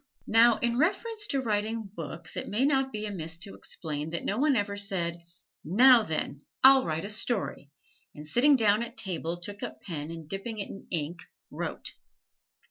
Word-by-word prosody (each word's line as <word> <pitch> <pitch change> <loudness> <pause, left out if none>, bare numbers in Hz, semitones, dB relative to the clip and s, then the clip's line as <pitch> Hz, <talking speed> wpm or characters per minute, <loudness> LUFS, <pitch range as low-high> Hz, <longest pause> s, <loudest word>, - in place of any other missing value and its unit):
Now, 230 +1 +5
in 235 +1 0
reference 420 +6 0
to 275 - 0
writing 220 0 -1
books 165 -1 -6
it - - -3
may 230 +6 +2
not 270 -2 +2
be 215 -2 -4
amiss 165 -5 -4
to 185 +3 -8
explain 150 -2 -5
that 170 +1 -3
no 205 - -1
one 290 -1 +3
ever 205 -2 0
said, 180 -4 -2 0.4
"Now 240 - +7
then, 155 -6 -3 0.2
I'll 265 0 +8
write 160 +2 -2
a - - -5
story!" 210 - -2 0.5
and 150 0 -9
sitting 270 - +5
down 215 -3 +4
at 235 +2 -5
table 175 -3 -2
took 205 +4 -7
up - - -6
pen 155 -4 -5
and 165 -2 -8
dipping 195 +5 -4
it 200 - -4
in 195 - -11
ink, 170 0 -2 0.3
wrote. - - -4
205 Hz, 180 wpm, -28 LUFS, 170-240 Hz, 0.5 s, I'll